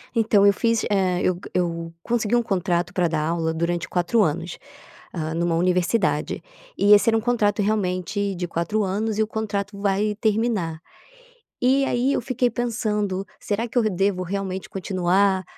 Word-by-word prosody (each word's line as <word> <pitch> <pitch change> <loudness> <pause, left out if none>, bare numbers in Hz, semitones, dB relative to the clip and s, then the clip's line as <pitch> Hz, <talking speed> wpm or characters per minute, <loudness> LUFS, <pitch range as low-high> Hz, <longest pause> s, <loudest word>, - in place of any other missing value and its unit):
Então 215 -3 +4
eu 200 - +6
fiz, 230 +2 +1
eh, 185 -3 +1
eu 180 -1 +1 0.2
eu 170 -2 -1
consegui 235 -1 0
um 240 - +3
contrato 180 -5 -1
pra 180 -2 +2
dar 155 -1 -1
aula 165 -1 0
durante 170 +1 -2
4 185 +6 +1
anos, 170 0 -1 0.5
hã, 160 -2 -3
numa 170 0 0
universidade. 180 +5 +1 0.4
E 205 +1 +6
esse 210 +3 +5
era 225 - +3
um - - -1
contrato 215 -3 +1
realmente 200 -1 -1
de 175 0 -3
4 170 +6 -1
anos 210 +3 -1
e 220 - +3
o 215 - -3
contrato 205 -2 -3
vai 205 +1 +1
terminar. 210 -7 0 0.8
E 265 +2 +3
aí 260 +3 +1
eu - - 0
fiquei 250 0 0
pensando: 210 -5 -2
"Será 220 +3 -2
que 245 - -5
eu 240 - +4
d 215 - +2
devo 195 -1 0
realmente 190 0 -4
continuar 190 0 +1
200 Hz, 170 wpm, -23 LUFS, 175-220 Hz, 0.8 s, eu